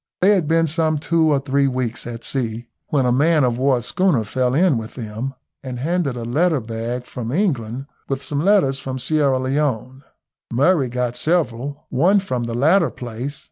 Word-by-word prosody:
They 195 - +6
had 185 -7 +2
been 165 +1 +3
some 160 0 +1
two 160 +1 +2
or 140 - +3
three 140 0 +1
weeks 125 -3 -3
at 115 -1 -7
sea, 120 -3 -3 0.2
when 140 -4 +1
a 125 - +3
man 150 +4 +3
of 120 -1 +1
war 130 -3 +2
schooner 180 - +1
fell 125 +4 0
in 165 -6 +3
with 110 0 -9
them, 120 +3 -5 0.3
and 130 -2 -6
handed 150 -1 -1
a 115 - -5
letter 155 +6 +2
bag 115 +2 -4
from 120 -2 -6
England, 135 - -1 0.2
with 135 0 -2
some 145 0 -1
letters 185 -9 +3
from 130 0 -5
Sierra 140 +1 +2
Leone. 130 -1 -1 0.5
Murray 140 +2 +3
got 125 0 -2
several. 145 -4 -1
One 180 +10 +3
from 130 -11 -3
the 115 0 -4
latter 160 +8 +4
place. 125 +4 -6
135 Hz, 180 wpm, -21 LUFS, 120-155 Hz, 0.5 s, They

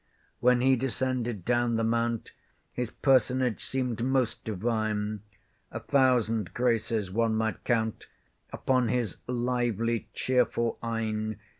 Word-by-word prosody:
When 125 0 +4
he 130 +1 +5
descended 125 -5 -2
down 120 -1 +2
the 115 - 0
mount, 115 0 0 0.4
His 125 -2 -2
personage 130 -3 +2
seemed 125 -3 -2
most 130 -3 0
divine: 110 -1 -1 0.5
A 115 - -4
thousand 115 - +2
graces 115 -5 0
one 115 +2 +1
might 110 -1 -1
count 110 -2 0 0.4
Upon 130 -2 +1
his 120 -5 -1
lovely 120 -2 -1
chearful 120 -2 +1
eyne. 110 -2 -2
115 Hz, 115 wpm, -28 LUFS, 110-125 Hz, 0.5 s, he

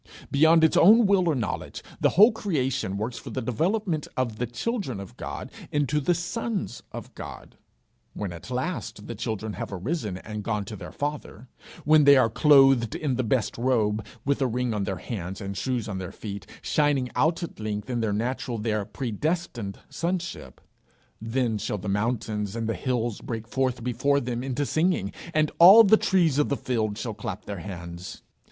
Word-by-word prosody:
Beyond 160 +3 +5
its 160 - +4
own 220 +5 +7
will 190 -3 +3
or 155 - +2
knowledge, 110 -8 -4 0.2
the - - +4
whole 215 +5 +9
creation 135 - -1
works 110 +4 -3
for - - -9
the - - -3
development 160 - -1
of 120 -4 -1
the 125 - -1
children 135 - -3
of 100 -2 -9
God - - -6 0.2
into 145 0 +1
the 175 +5 +1
sons 190 - -3
of - - -8
God. - - -9 0.6
When 100 -4 -4
at 85 +7 -10
last 130 - -4
the - - -5
children 110 -1 -4
have - - -5
arisen 105 - -3
and 105 +2 -6
gone 105 -2 -2
to 105 - -7
their - - -9
Father; 140 -5 -5 0.4
when 155 0 +6
they 140 -1 +8
are 115 -4 +3
clothed 135 -4 +5
in 145 -4 -1
the 130 - 0
best 115 -1 0
robe, 110 -4 +1 0.2
with 140 +1 +1
a 130 - +3
ring 125 0 -1
on 105 -2 -1
their 95 - -2
hands 95 -1 -6
and 100 -1 -5
shoes 120 +2 -2
on 95 -3 -4
their 90 -2 -6
feet, 100 -2 -7 0.2
shining 145 -4 +1
out 165 +3 +2
at 170 - -7
length 105 -1 -3
in 125 -2 -2
their 110 -2 0
natural, 120 +3 -2
their 110 -1 -1
predestined 120 - -3
sonship; 170 - -4 0.6
then 115 -1 -1
shall 105 - -2
the 100 +1 -7
mountains 105 0 -1
and 115 -1 -2
the 115 - 0
hills 120 +2 -2
break 115 -2 -5
forth 130 -1 -1
before 140 +4 +1
them 120 -1 -3
into 135 +2 -1
singing, 155 - 0 0.2
and 155 -2 +2
all 195 +7 +10
the 220 +1 +6
trees 170 -9 +2
of 150 - +2
the 140 - 0
field 110 -4 -1
shall 115 -1 -4
clap 105 -2 -6
their 100 -3 -5
hands. 85 -1 -8
125 Hz, 185 wpm, -26 LUFS, 105-150 Hz, 0.6 s, all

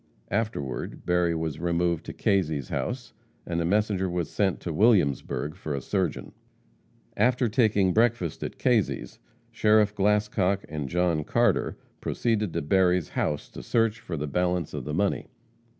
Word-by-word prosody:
Afterward, 100 - -3
Berry 90 -1 +2
was 80 -2 -3
removed 85 -1 0
to - - -5
Kazy's 80 -9 0
house, 125 +1 -3 0.3
and 85 -1 -1
a - - 0
messenger 100 0 +1
was 85 -2 -2
sent 95 -3 +1
to 85 - -4
Williamsburg 75 - +2
for 80 -6 -4
a - - -2
surgeon. 90 +3 -2 0.8
After 125 +3 +2
taking 105 -5 +3
breakfast 110 -8 +1
at - - -5
Kazy's, 110 - 0 0.3
Sheriff 105 -1 +3
Glascock 105 -1 +1
and 75 -3 -4
John 85 -2 +1
Carter - - +1 0.2
proceeded 110 -5 0
to - - -1
Berry's 90 +1 +2
house 75 - -2
to - - -9
search 115 - +1
for 85 - -5
the 75 - -2
balance 90 +2 -1
of - - -5
the 75 - -4
money. 100 +3 0
90 Hz, 150 wpm, -27 LUFS, 80-105 Hz, 0.8 s, taking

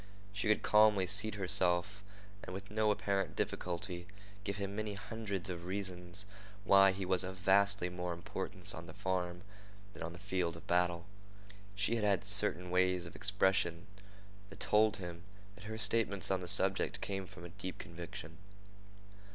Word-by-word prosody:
She 105 +1 -2
could 105 - +2
calmly 105 -3 +5
seat 100 +3 +1
herself 95 +1 +1 0.4
and 90 - -7
with 100 +1 -8
no 110 0 +2
apparent 100 -4 -1
difficulty 90 0 -3 0.4
give 100 -1 -3
him 100 -1 -4
many 105 -1 -3
hundreds 100 -2 -5
of 85 -2 -5
reasons 95 0 -4 0.4
why 95 -1 +6
he 95 0 -4
was 90 0 +2
of 95 0 -6
vastly 100 0 +3
more 90 0 -4
importance 90 +2 -5
on 85 +1 -8
the 80 - -11
farm 90 -1 -2 0.5
than - - -12
on 80 +1 -4
the - - -10
field 90 -3 -2
of - - -13
battle. 85 -1 +1 0.7
She 105 +3 0
had 110 - -2
had 100 -3 +1
certain 90 +1 +7
ways 90 -1 +2
of 85 - -11
expression 95 -3 +1 0.6
that 100 - -13
told 110 0 +3
him 85 -2 -7 0.3
that 105 0 -14
her 110 +1 -5
statements 105 -3 +1
on 95 - +1
the 90 - -6
subject - - +1
came 95 -1 -4
from 85 - -11
a - - -8
deep 90 +2 -7
conviction. 85 -1 -9
95 Hz, 165 wpm, -34 LUFS, 90-100 Hz, 0.7 s, certain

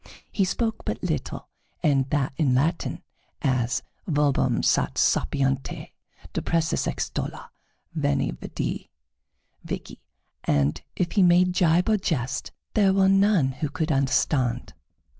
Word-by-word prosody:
He 195 - +1
spoke 225 +3 -2
but - - -4
little, - - -3 0.4
and 140 -4 +2
that 140 -2 0
in 135 -5 +2
Latin, 160 +6 0 0.4
as 125 -2 +1 0.2
"Verbum 145 -4 +2
sat - - +2
sapienti; 135 -1 0 0.4
depressus 165 -1 0
extollor; - - -4 0.4
veni, 70 -1 0
vidi, - - -5 0.7
vici;" - - -6 0.4
and 75 +2 +1
if 175 -2 -1
he 200 - +3
made 180 0 +5
gibe 175 0 +3
or 220 -1 +3
jest, 135 -10 -2 0.2
there 200 -3 +4
were 190 -1 +4
none 195 -7 +4
who 145 +3 -3
could 155 +2 -2
understand. 130 -2 +1
150 Hz, 120 wpm, -25 LUFS, 135-180 Hz, 0.7 s, made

